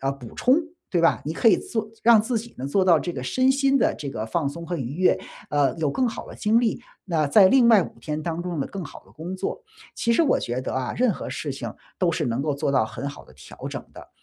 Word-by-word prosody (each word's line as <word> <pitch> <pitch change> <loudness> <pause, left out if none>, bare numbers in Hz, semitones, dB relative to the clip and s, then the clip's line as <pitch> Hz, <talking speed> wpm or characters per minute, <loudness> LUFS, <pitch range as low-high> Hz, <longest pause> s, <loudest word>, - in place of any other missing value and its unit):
呃， 135 0 0
补 125 -4 -11
充， 255 +2 +4 0.3
对 175 - +2
吧？ 165 - +3
你 155 - -2
可 225 +7 +3
以 200 - +6
做 220 -2 -4
让 230 -2 +7
自 230 +2 -2
己 230 +2 -10
呢， 130 - -4
做 185 +7 +2
到 170 -4 +5
这 175 - -3
个 130 - -5
身 255 - +2
心 275 0 +2
的 - - +2
这 140 -2 -5
个 110 -3 -4
放 140 +5 -1
松 170 +3 -8
和 175 - -2
愉 135 -2 -4
悦， 185 +3 +3 0.3
呃， 145 -2 +2
有 160 -2 0
更 255 - +1
好 - - -6
的 - - -10
精 220 +2 +3
力， 235 0 0 0.2
那 165 -6 +1
在 195 +6 +7
另 255 -1 +5
外 220 -5 +7
5 - - -10
天 150 0 -3
当 170 +1 -3
中 175 -2 -4
呢 - - -1
更 195 -3 -6
好 - - -11
地 - - -20
工 175 +4 -6
作。 200 - -4 0.3
其 235 - +1
实 330 - +4
我 285 - +3
觉 120 +2 -2
得 130 - -4
啊， 130 -1 -2
任 245 -4 +3
何 - - -6
事 145 - -4
情 120 -5 -6 0.3
都 180 -3 +2
是 155 -3 -1
能 120 +2 -1
够 150 -1 0
做 140 - -1
到 130 -4 +3
很 120 +5 -5
好 145 - -10
的 - - -18
调 75 - -9
整 - - -6
的， - - -12
170 Hz, 290 characters per minute, -24 LUFS, 140-220 Hz, 0.3 s, 让